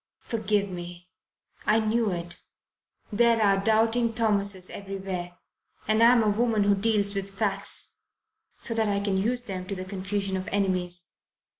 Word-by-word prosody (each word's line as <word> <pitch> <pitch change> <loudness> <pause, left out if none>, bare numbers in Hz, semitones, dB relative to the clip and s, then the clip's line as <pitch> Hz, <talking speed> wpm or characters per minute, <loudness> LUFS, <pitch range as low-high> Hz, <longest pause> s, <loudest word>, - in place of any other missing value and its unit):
"Forgive 210 -3 0
me 175 -1 -8 0.6
I 215 +1 +4
knew 220 0 +1
it 175 -1 -5 0.7
there 235 +1 +4
are 195 -2 +3
doubting 225 +2 +2
Thomases 200 -4 +1
everywhere 190 -3 -6 0.5
and 215 +1 +2
I'm 235 0 +6
a - - +1
woman 220 0 +1
who 200 0 +4
deals 205 0 +1
with 195 -1 -3
facts, 200 -2 0 0.6
so 235 - -2
that 220 -2 +1
I 200 0 +1
can 200 -1 -1
use 240 +5 0
them 185 -5 -6
to 195 - -4
the 185 0 -6
confusion 195 0 -3
of 185 - -5
enemies. 180 -3 -1
200 Hz, 150 wpm, -26 LUFS, 190-220 Hz, 0.7 s, I'm